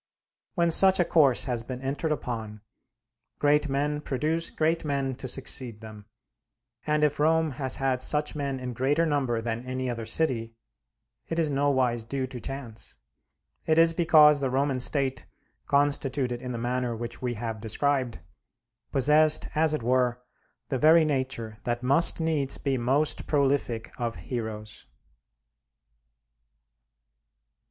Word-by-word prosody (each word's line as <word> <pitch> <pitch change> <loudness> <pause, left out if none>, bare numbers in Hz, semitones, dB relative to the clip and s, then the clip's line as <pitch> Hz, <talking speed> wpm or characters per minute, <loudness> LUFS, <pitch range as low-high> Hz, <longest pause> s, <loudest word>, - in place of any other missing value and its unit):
When 170 -2 +2
such 190 +3 +6
a 175 - +3
course 140 -8 +3
has 125 -3 -1
been 125 +2 -7
entered 140 +4 -3
upon, 110 -7 -4 0.8
great 150 0 +2
men 145 +2 -1
produce 155 +5 -1
great 160 +1 0
men 140 -3 -1
to 135 - -6
succeed 125 -3 -3
them; 105 -2 -12 0.8
and 150 0 +1
if 150 0 +1
Rome 160 +1 +2
has 130 0 -1
had 130 -1 -1
such 150 +2 +3
men 140 -2 -3
in 125 -1 -5
greater 140 +7 +1
number 135 -7 0
than 115 +1 -4
any 130 0 -3
other 115 -2 -6
city, 115 -4 -1 0.7
it 165 - -4
is 160 -3 +1
nowise 130 -4 +1
due 130 +3 -3
to 130 -1 -8
chance; 125 -5 -7 0.7
it 160 0 +3
is 165 0 +5
because 155 -3 +5
the 135 -2 -1
Roman 135 0 0
State, 135 0 0 0.4
constituted 140 -3 0
in 125 -1 -5
the 120 - -4
manner 120 0 -2
which 120 +1 -6
we 125 -1 -2
have 110 -1 -5
described, 130 - -1 0.7
possessed 150 +3 +3
as 160 0 +2
it 125 - -5
were 125 0 +1 0.5
the 130 - -1
very 160 +2 +6
nature 130 -6 -3
that 120 0 -3
must 140 +8 +3
needs 155 -4 -1
be 140 -2 -1
most 135 +5 0
prolific 135 -6 0
of 115 -1 -2
heroes. 110 -3 -6
135 Hz, 140 wpm, -27 LUFS, 120-150 Hz, 0.8 s, such